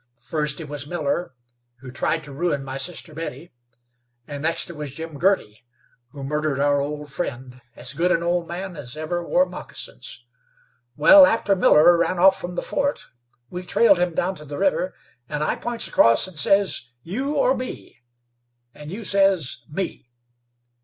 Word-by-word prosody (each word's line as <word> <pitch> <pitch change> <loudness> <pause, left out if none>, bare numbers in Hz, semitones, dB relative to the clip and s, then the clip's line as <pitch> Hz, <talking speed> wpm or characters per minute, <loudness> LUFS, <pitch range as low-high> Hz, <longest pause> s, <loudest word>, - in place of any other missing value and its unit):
First 150 +5 -2
it 160 - -7
was 145 -1 -6
Miller, 155 -2 -2 0.5
who 130 -2 -9
tried 160 +5 -1
to 145 - -10
ruin 145 -2 -1
my 135 0 -5
sister 160 +2 -4
Betty, 165 +2 -7 0.7
and 145 -1 -7
next 165 +2 0
it - - -11
was 150 -3 -7
Jim 160 -2 -7
Girty, 175 - +1 0.5
who 140 +2 -9
murdered 150 0 -1
our 145 0 +2
old 150 0 -5
friend, 130 -4 -5
as 125 +2 -3
good 170 +4 +1
an 170 - +2
old 175 0 0
man 180 +1 -6
as 135 -2 -9
ever 170 +3 -3
wore 270 +10 +3
moccasins. - - -8 0.7
Wal, 280 - +8
after 215 -5 +2
Miller 175 -1 +6
ran 185 - +1
off 190 +2 +5
from 175 0 -5
the - - -2
fort, 280 0 -2 0.4
we 180 - -5
trailed 195 +1 +4
him 175 -2 0
down 185 +2 0
to 150 - -11
the 145 0 -7
river, 190 -1 0 0.3
and 150 0 -2
I - - 0
points 240 -1 -3
across 115 0 +4
and 175 -5 -4
says, 195 -9 +2
'You 265 - -3
or 270 -2 +3
me?' 255 0 -7 0.7
and 150 0 -10
you 205 +6 -6
says, 195 -10 +2
'Me.' 155 -6 -5
165 Hz, 170 wpm, -23 LUFS, 145-190 Hz, 0.7 s, Wal